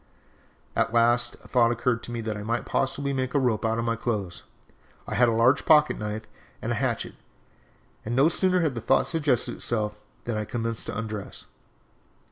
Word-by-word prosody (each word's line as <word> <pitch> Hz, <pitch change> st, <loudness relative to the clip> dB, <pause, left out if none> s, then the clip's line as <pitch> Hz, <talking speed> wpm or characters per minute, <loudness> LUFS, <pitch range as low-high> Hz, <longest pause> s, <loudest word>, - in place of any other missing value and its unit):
"At 115 Hz, -, +1 dB
last 120 Hz, +1 st, +3 dB
a -, -, -14 dB
thought 120 Hz, -2 st, +3 dB
occurred 120 Hz, 0 st, 0 dB
to -, -, -7 dB
me 120 Hz, -1 st, -3 dB
that 110 Hz, -1 st, -3 dB
I 105 Hz, -, -6 dB
might 115 Hz, +3 st, -2 dB
possibly 140 Hz, +1 st, -1 dB
make 130 Hz, 0 st, -2 dB
a -, -, +5 dB
rope 120 Hz, -5 st, +1 dB
out 115 Hz, 0 st, +1 dB
of 115 Hz, -, -1 dB
my 115 Hz, 0 st, 0 dB
clothes. 105 Hz, -6 st, -3 dB, 0.6 s
I -, -, -5 dB
had 120 Hz, +3 st, +4 dB
a -, -, +3 dB
large 115 Hz, +4 st, +3 dB
pocket 150 Hz, -1 st, +4 dB
knife 105 Hz, +1 st, -4 dB, 0.4 s
and -, -, -3 dB
a -, -, +1 dB
hatchet, -, -, -1 dB, 0.9 s
and 120 Hz, +2 st, -3 dB
no 135 Hz, +4 st, +5 dB
sooner 185 Hz, +2 st, +2 dB
had 155 Hz, -5 st, +1 dB
the 115 Hz, -, -5 dB
thought 135 Hz, +4 st, +3 dB
suggested 145 Hz, -7 st, +1 dB
itself 105 Hz, -2 st, -2 dB, 0.2 s
than 120 Hz, -, -2 dB
I 105 Hz, -, -2 dB
commenced 115 Hz, 0 st, -3 dB
to -, -, -4 dB
undress. 105 Hz, -2 st, -6 dB
115 Hz, 195 wpm, -26 LUFS, 110-130 Hz, 0.9 s, a